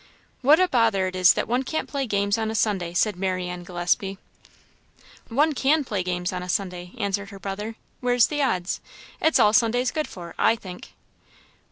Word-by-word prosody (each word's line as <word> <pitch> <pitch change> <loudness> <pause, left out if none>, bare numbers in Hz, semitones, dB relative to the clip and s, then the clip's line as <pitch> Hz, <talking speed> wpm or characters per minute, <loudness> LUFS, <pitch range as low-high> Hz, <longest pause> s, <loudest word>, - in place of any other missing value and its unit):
"What 290 +5 +6
a 370 - +4
bother 225 - +2
it 185 0 -4
is 185 0 +6
that - - -2
one 245 +3 +1
can't 315 +4 -3
play 275 -3 -3
games 200 0 +1
on 220 -1 -1
a 220 - -3
Sunday!" 190 -6 0
said 210 +2 +2
Marianne 180 -1 -2
Gillespie. 180 +2 -1 1.1
"One 295 +6 +2
can 290 +3 +2
play 210 -7 -2
games 180 0 -2
on 180 - -3
a 180 - -7
Sunday," 180 -1 -3
answered 200 -2 -2
her 200 - -10
brother. 205 +3 -5 0.2
"Where's 245 -1 +3
the 295 -1 -2
odds? 185 -9 -1 0.4
It's 320 - +4
all 210 - +5
Sunday's 245 +1 +2
good 310 -1 -2
for, 170 -2 -9
I - - +4
think." 185 -5 -11
205 Hz, 185 wpm, -24 LUFS, 185-245 Hz, 1.1 s, What